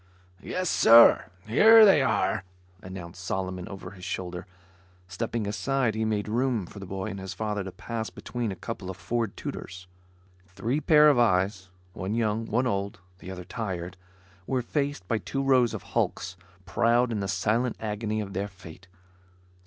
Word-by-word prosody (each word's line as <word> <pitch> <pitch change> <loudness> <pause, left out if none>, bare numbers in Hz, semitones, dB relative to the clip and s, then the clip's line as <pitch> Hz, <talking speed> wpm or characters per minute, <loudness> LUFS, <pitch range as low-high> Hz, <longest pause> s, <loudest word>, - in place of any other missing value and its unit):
"Yes, 185 - -3
sir, 115 -6 +7 0.2
here 220 - +8
they 195 -8 +6
are," 110 -6 +1 0.4
announced 90 -1 -9
Solomon 95 -1 -3
over 95 -2 -8
his 90 -2 -13
shoulder. 90 0 -5 0.6
Stepping 110 +3 -3
aside 110 +4 0
he 110 +1 -1
made 105 -1 -1
room 120 -2 0
for 100 - -11
the 95 - -8
boy 95 0 -4
and 100 - -6
his 95 -1 -6
father 105 -2 -2
to 95 - -7
pass, 115 +3 -5
between 120 -4 -4
a - - -5
couple 100 -2 -6
of 95 - -6
Ford 115 +6 -2
Tudors. 90 0 -7 0.6
Three 110 +11 -2
pair 150 0 +6
of 145 -5 +5
eyes, 95 -4 +1 0.2
one 95 +4 -3
young, 110 -1 0
one 125 +4 +1
old, 100 -3 -2 0.2
the - - -10
other 90 -1 -7
tired, 95 -3 -5 0.5
were 130 -2 0
faced 140 -7 -2
by 115 - 0
two 135 +6 -3
rows 130 -4 +4
of - - -6
hulks, 90 0 -2 0.3
proud 120 +7 +2
in 110 - -1
the 100 - -2
silent 110 +6 0
agony 110 0 -2
of 100 -2 -6
their 100 +2 -2
fate. 90 -1 -14
105 Hz, 170 wpm, -27 LUFS, 95-120 Hz, 0.6 s, here